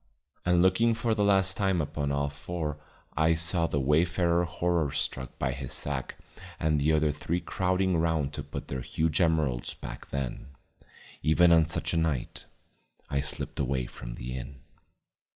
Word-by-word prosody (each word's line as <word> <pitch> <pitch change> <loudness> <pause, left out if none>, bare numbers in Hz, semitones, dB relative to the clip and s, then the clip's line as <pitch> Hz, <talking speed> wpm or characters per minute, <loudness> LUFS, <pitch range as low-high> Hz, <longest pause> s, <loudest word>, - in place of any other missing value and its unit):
And 90 0 +4
looking 115 +5 +4
for 115 0 0
the 105 -2 +1
last 95 -2 +4
time 95 -3 +1
upon 75 -2 -2
all 70 0 0
four 75 0 -4 0.4
I 80 +2 +3
saw 85 +1 +1
the 70 - -1
wayfarer 85 +4 +2
horror 85 -1 0
struck 65 -1 -3
by - - 0
his - - -5
sack 70 -3 -3 0.4
and 75 -1 +2
the 75 +2 +2
other 75 -1 +3
three 80 +4 -2
crowding 95 0 0
round 80 -3 +1
to - - -4
put - - -7
their 65 -1 -4
huge 80 +7 0
emeralds 75 -8 +1
back - - -9
then, 70 -3 -4 0.7
even 85 +3 +5
on 80 -1 +6
such 85 - -2
a - - +1
night, 80 -6 -2 0.6
I 70 - +1
slipped 70 - -3
away 65 -2 0
from - - -8
the 65 +1 -6
inn. 65 0 -8
80 Hz, 165 wpm, -28 LUFS, 70-85 Hz, 0.7 s, on